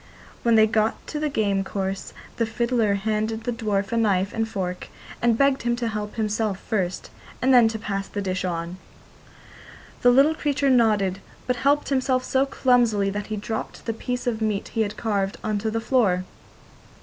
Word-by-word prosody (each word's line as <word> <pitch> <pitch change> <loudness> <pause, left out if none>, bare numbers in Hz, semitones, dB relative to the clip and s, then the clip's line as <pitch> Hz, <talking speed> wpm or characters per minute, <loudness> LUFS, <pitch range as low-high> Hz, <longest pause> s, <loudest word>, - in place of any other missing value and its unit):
When 235 -1 +3
they 220 -1 +7
got 220 0 0
to 300 - -3
the 300 0 0
game 200 -7 0
course 195 0 -4 0.3
the 230 - +1
fiddler 230 -2 +1
handed 220 +2 -1
the 245 - -1
dwarf 210 -4 -1
a 230 - 0
knife 200 -3 +1
and 225 0 -1
fork, 180 -4 -4 0.3
and 235 -1 +3
begged 275 0 +3
him 240 0 0
to 240 -1 -2
help 210 -1 -5
himself 215 -2 -1
first, 190 -5 -3 0.3
and 260 +1 +3
then 240 -3 +7
to 225 0 -2
pass 195 -2 -3
the 205 - -5
dish 185 -2 -2
on. 170 0 -3 1.2
The 245 - +6
little 275 +5 +5
creature 285 -3 +1
nodded, 210 -6 +3 0.3
but 250 -1 0
helped 285 +3 +2
himself 260 -2 +1
so 265 +1 +1
clumsily 235 -7 +2
that 205 +1 -4
he 215 - -3
dropped 220 +2 -5
the 225 - -1
piece 245 +2 -4
of 230 -3 -1
meat 210 -2 -1
he 225 - -1
had 210 -1 -2
carved 200 -3 -1
on 215 -1 -1
to 220 +2 -1
the 225 +1 -1
floor. 220 -7 +2
220 Hz, 185 wpm, -24 LUFS, 200-245 Hz, 1.2 s, they